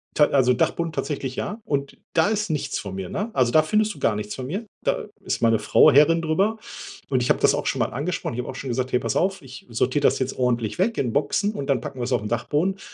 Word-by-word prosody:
Ta 150 - +6
also 130 -2 +3
Dachboden 165 +6 0
tatsächlich, 135 -5 -3
ja, 210 +2 -4
und 140 -1 -2 0.2
da 160 +2 +3
ist 215 -1 -1
nichts 150 -3 -2
von 95 -2 -6
mir, 95 -2 -5
ne? 210 +3 -3
Also 125 -2 +2
da 155 - +6
findest 215 +7 +1
du - - -14
gar 110 - +1
nichts 105 0 -5
von 130 -1 -6
mir. 200 - -4 0.2
Da - - 0 0.2
ist - - -2
meine 115 -1 +3
Frau 105 +8 +5
Herrin 150 +4 +5
drüber 190 +8 +1 0.5
und 130 -2 +1
ich 120 - -1
habe - - +3
das - - +4
auch - - -2
schon - - -1
mal - - +2
angesprochen. 150 +1 -3
Ich 120 - -5
habe 125 - -4
auch - - -6
schon 135 - -6
gesagt: 130 +1 -2
„Hey, 125 - +2
pass 115 -2 -2
auf, 195 +2 0
ich 130 -2 -12
sortiere 125 +5 0
das - - +3
jetzt 130 0 -2
ordentlich 120 -2 0
weg 225 +5 +1
in 120 -4 -1
Boxen 150 +8 +1
und 140 -9 -5
dann 135 -4 +2
packen 130 - -7
wir's 120 +1 -3
auf 125 - +2
den 105 - -5
Dachboden“, 145 - 0
und 190 - -22
140 Hz, 270 wpm, -23 LUFS, 120-170 Hz, 0.5 s, Ta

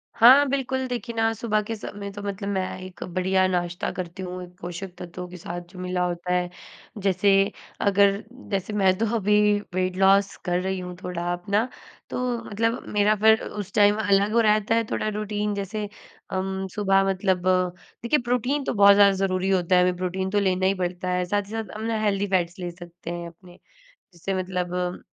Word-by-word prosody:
हाँ, 260 +5 +8
बिल्कुल, 260 -1 -1
देखिए 240 -1 -4
ना 225 0 +2
सुबह 215 -1 0
के 225 +2 -4
समय 215 - -7
में 200 0 -5
तो 205 +1 -8
मतलब 200 0 -4
मैं 190 -2 -2
एक 185 -1 -8
बढ़िया 185 +1 +2
नाश्ता 175 -1 -1
करती 185 +1 -6
हूँ, 180 0 -5
एक 180 0 -13
पोषक 180 +2 -6
तत्वों 180 +1 -7
के 180 - -9
साथ 175 +1 -6
जो 185 - -11
मिला 180 0 -1
होता 175 +1 -2
है, 180 0 0 0.5
जैसे 195 0 +2 0.5
अगर 200 +1 +3 0.3
जैसे 195 +1 -2
मैं 190 -2 +3
तो 225 - +1
अभी 210 -1 +3 0.4
वेट 185 0 0
लॉस 195 +1 +4
कर 180 -1 +1
रही 190 0 -2
हूँ 180 0 -6
थोड़ा 175 -1 -3
अपना, 200 +6 0 0.4
तो 250 -1 -1
मतलब 225 +3 0
मेरा 210 +1 +4
फिर 220 +2 +5
उस 205 -2 -7
टाइम 205 0 +5
अलग 200 +3 +3
रहता 215 0 +3
है, 230 - +2
थोड़ा - - -1
रूटीन 210 0 -2
जैसे 205 +1 -3 0.4
अम, 190 0 -2
सुबह 195 -2 +3
मतलब 185 -1 0 0.6
देखिए 265 +6 +2
प्रोटीन 250 +4 0
तो - - -2
बहुत 200 -2 +7
ज़्यादा 200 -1 +7
ज़रूरी 190 0 0
होता 185 -1 +2
है, 180 - +6
हमें 180 0 +2
प्रोटीन 185 +1 -2
तो 205 +1 +2
लेना 190 -1 +1
ही 190 - +4
पड़ता 180 -1 -3
है, 180 0 0
साथ 205 +3 0
ही - - -12
साथ 220 -3 -5
हम 215 - -6
ना 225 -1 -1
हेल्थी 205 -1 +1
फैट्स 180 -1 0
ले 175 -1 -4
सकते 175 -1 -9
हैं 170 0 -5
अपने, 175 +1 -16 0.5
जिससे 175 +3 -4
मतलब 180 -1 -2
195 Hz, 195 wpm, -25 LUFS, 180-210 Hz, 0.6 s, हाँ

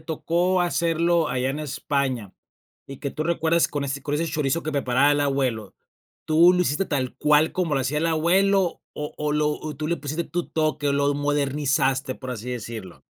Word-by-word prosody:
tocó 170 +3 0
hacerlo 170 -1 +1
allá 125 +1 -1
en 145 +3 -4
España, 135 -7 -2 0.5
y 135 - -8
que 140 - -4
tú 155 - -3
recuerdes 165 0 +2
con 145 -1 -3
ese 140 0 -4
con 145 +1 -2
ese 165 +3 0
chorizo 155 +1 -1
que 155 - -3
preparaba 140 +1 +3
el 145 - +1
abuelo, 130 -7 -1 0.5
¿tú 165 +3 +6
lo 180 - +1
hiciste 165 +5 0
tal 130 -6 -2
cual 150 +2 +3
como 170 -5 0
lo 135 - +1
hacía 145 +4 -1
el 165 - 0
abuelo, 185 +3 +2
o 150 0 -6
o 150 0 -2
lo 150 0 +2
o 150 -1 -6
tú 155 0 -3
le 170 +1 0
pusiste 155 +3 -4
tu 175 0 -4
toque, 155 -2 0
o, 140 - +2
lo 140 0 +1
modernizaste, 140 -2 0
por 130 -1 -7
así 120 +1 -6
decirlo? 110 -6 -7
150 Hz, 195 wpm, -24 LUFS, 135-165 Hz, 0.5 s, tú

